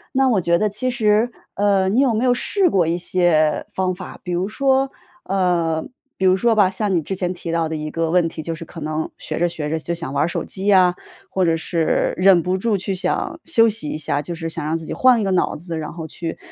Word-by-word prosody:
那 265 0 +4
我 220 - +3
觉 170 0 +2
得 215 - +1
其 255 +5 -2
实， 220 0 +2 0.2
呃， 200 -2 +2
你 225 +7 +2
有 265 -4 +3
没 225 +3 0
有 245 -1 +3
试 380 +8 +1
过 185 - +2
一 165 +1 0
些 170 -4 +2
方 185 -1 -1
法， 185 0 -9
比 180 - -6
如 175 +2 0
说 270 +4 +1 0.3
呃， 175 -4 0 0.3
比 190 - -4
如 185 +1 +4
说 235 +3 +3
吧， 205 -4 +4
像 195 0 -1
你 170 - +2
之 190 +5 -4
前 180 -1 -2
提 175 -2 -6
到 165 -1 0
的 160 - -4
一 155 0 -4
个 165 0 -1
问 175 -2 +3
题， 160 -1 -7
就 165 - -3
是 165 - -7
可 165 0 -10
能 155 +1 -3
学 - - -5
着 175 0 +2
学 150 -3 -4
着 160 - 0
就 170 - -5
想 165 -5 -5
玩 145 +1 +2
儿 - - -1
手 175 - -3
机 195 +2 -5
呀， 185 -3 +5 0.4
或 190 - +1
者 165 -1 +2
是 165 0 0
忍 185 -2 +5
不 185 +1 -1
住 215 0 +1
去 195 +1 -2
想 195 - -2
休 230 -9 +4
息 215 -8 -1
一 - - -3
下， 145 -1 -1
就 170 +4 -6
是 165 0 -5
想 165 -1 -5
让 155 +2 -1
自 165 - -9
己 - - -5
换 255 -2 +4
一 215 - 0
个 195 - 0
脑 185 - +1
子， 165 0 -5
然 155 - -5
后 165 -2 -7
去 165 0 -6
180 Hz, 280 characters per minute, -20 LUFS, 165-205 Hz, 0.4 s, 呀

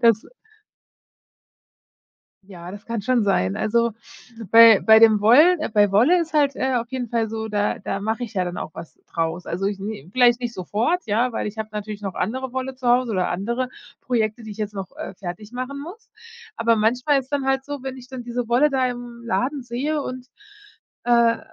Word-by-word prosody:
Das 230 -2 +4 2.2
Ja, 180 -2 -10
das 205 +1 -11
kann 230 -3 -3
schon 240 -1 +2
sein. 95 - +1
Also, 235 +1 +1 0.6
bei 230 -3 +9
bei 220 0 +6
dem 220 -2 +6
Wollen 300 +12 +6 0.2
bei 205 -1 +4
Wolle 265 - +4
ist 325 -1 -4
halt, 285 -3 +2
äh, 260 0 -1
auf 235 0 -2
jeden 255 -2 -4
Fall 225 -1 0
so, 220 0 -4
da 205 -1 -1
da 195 - -3
mache 220 +4 -2
ich 230 -3 -6
ja 185 - 0
dann 175 0 -5
auch - - -5
was 165 - -10 0.2
draus. 165 +1 -2
Also, 190 +3 -3
ich 200 -1 -3
nähe 200 -7 -6
vielleicht 245 -1 +4
nicht 235 -2 -4
sofort, 225 - -1
ja, 230 +4 +1
weil 210 - -2
ich 220 - -10
habe 220 0 -3
natürlich 210 0 -6
noch 195 -3 -5
andere 255 +7 -3
Wolle 260 0 -4
zu 255 - -7
Hause 245 0 +3
oder 185 -2 0
andere 235 +8 -2 0.3
Projekte, 225 -2 -1
die 215 - -7
ich - - -13
jetzt 210 -1 -4
noch, 195 -2 -7
äh, - - -7
fertig 185 +3 -8
machen 255 +3 -5
muss. 375 +9 -11 0.5
Aber 230 0 +2
manchmal 250 +6 +2
ist 265 - -3
es 265 - -30
dann 285 -2 -1
halt 270 0 0
so, 285 -2 -6
wenn 265 -1 -5
ich 250 -1 -12
dann 260 -1 -7
diese 240 0 -4
Wolle 270 +5 +3
da 260 -1 +1
im 240 -1 -7
Laden 255 +4 -1
sehe 275 +6 -2
und, 255 -2 -6 0.8
äh, 235 -1 +4
235 Hz, 205 wpm, -22 LUFS, 210-255 Hz, 2.2 s, bei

